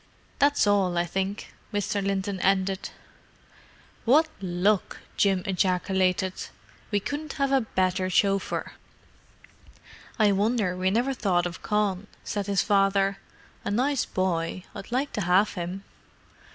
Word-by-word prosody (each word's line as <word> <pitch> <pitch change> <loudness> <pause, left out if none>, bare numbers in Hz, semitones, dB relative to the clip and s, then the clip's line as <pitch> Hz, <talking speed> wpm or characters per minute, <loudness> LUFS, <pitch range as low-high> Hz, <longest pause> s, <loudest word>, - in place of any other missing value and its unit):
That's 285 -3 +4
all, 195 -4 +2
I 175 - +2
think," 190 +4 -3 0.2
Mr. 205 -1 -1
Linton 195 0 -1
ended. 190 0 +1 1.1
"What 300 +7 +5
luck!" 185 +2 0 0.2
Jim 195 -2 +2
ejaculated. 185 0 +1 0.6
"We 205 - +1
couldn't 295 +8 -4
have 275 -1 0
a 270 -1 +4
better 185 -3 0
chauffeur." 195 +1 +1 1.5
"I 215 -3 +4
wonder 205 -1 +1
we 185 +1 +1
never 240 +7 +1
thought 180 -8 +1
of 175 0 -5
Con," 210 -2 0 0.2
said 205 -1 -3
his 200 -1 +2
father. 195 -1 +2 0.4
"A - - -3
nice 255 +6 +1
boy; 180 -1 -1
I'd 195 - -9
like 265 +4 -1
to 210 - -2
have 185 +3 +3
him." 180 +2 -5
195 Hz, 125 wpm, -26 LUFS, 185-210 Hz, 1.5 s, What